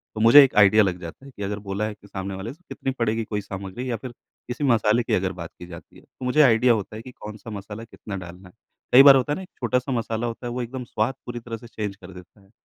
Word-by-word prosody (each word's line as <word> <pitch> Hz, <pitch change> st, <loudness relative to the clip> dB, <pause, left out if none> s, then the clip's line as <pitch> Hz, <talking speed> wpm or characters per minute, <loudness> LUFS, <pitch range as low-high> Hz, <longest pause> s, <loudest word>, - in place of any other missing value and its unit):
तो 110 Hz, -, -3 dB
मुझे 120 Hz, +6 st, +9 dB
एक 135 Hz, -, 0 dB
आइडिया 105 Hz, +1 st, +7 dB
लग 90 Hz, -2 st, -1 dB
जाता 85 Hz, +11 st, -9 dB
है 140 Hz, -, -12 dB
कि 100 Hz, -, -6 dB
अगर 105 Hz, +1 st, -3 dB
बोला 100 Hz, +2 st, -1 dB
है 110 Hz, -, -4 dB
कि 100 Hz, -1 st, -19 dB
सामने 95 Hz, -1 st, -5 dB
वाले 105 Hz, +7 st, -6 dB
से 165 Hz, -, -25 dB
कितनी 135 Hz, -, -3 dB
पड़ेगी 115 Hz, 0 st, 0 dB
कोई 105 Hz, -1 st, -3 dB
सामग्री 100 Hz, +6 st, -6 dB
या 120 Hz, -, 0 dB
फिर 130 Hz, +1 st, -8 dB, 0.4 s
किसी 125 Hz, +4 st, -4 dB
मसाले 115 Hz, -3 st, +3 dB
की -, -, -2 dB
अगर 95 Hz, 0 st, +1 dB
बात 85 Hz, -, -6 dB
की 90 Hz, -, -8 dB
जाती 85 Hz, -1 st, -12 dB
है। -, -, -16 dB
तो 130 Hz, -, -11 dB
मुझे 135 Hz, +5 st, +4 dB
आइडिया 120 Hz, -2 st, +5 dB
होता 110 Hz, 0 st, -4 dB
है 110 Hz, -, -7 dB
कि 130 Hz, -, -11 dB
कौन-सा 105 Hz, -1 st, -10 dB
मसाला 105 Hz, +1 st, -7 dB
कितना 110 Hz, -3 st, -9 dB
डालना 90 Hz, +1 st, -10 dB
है? -, -, -23 dB, 0.4 s
कई 130 Hz, +2 st, +10 dB
बार 140 Hz, -1 st, +10 dB
होता 135 Hz, +2 st, +1 dB
है -, -, -1 dB
ना -, -, -6 dB
एक 185 Hz, -, -11 dB
छोटा-सा 125 Hz, +2 st, 0 dB
मसाला 115 Hz, -1 st, -2 dB
होता 115 Hz, +1 st, -6 dB
है, -, -, -4 dB
वो 125 Hz, -, -3 dB
एकदम 125 Hz, +2 st, -5 dB
स्वाद 115 Hz, +2 st, -1 dB
पूरी 120 Hz, -1 st, -5 dB
तरह 115 Hz, -1 st, -7 dB
से 120 Hz, -, -13 dB
चेंज 105 Hz, -3 st, -5 dB
कर 95 Hz, -1 st, -13 dB
देता 90 Hz, +3 st, -15 dB
है। 95 Hz, -, -24 dB
110 Hz, 285 wpm, -24 LUFS, 100-125 Hz, 0.4 s, कई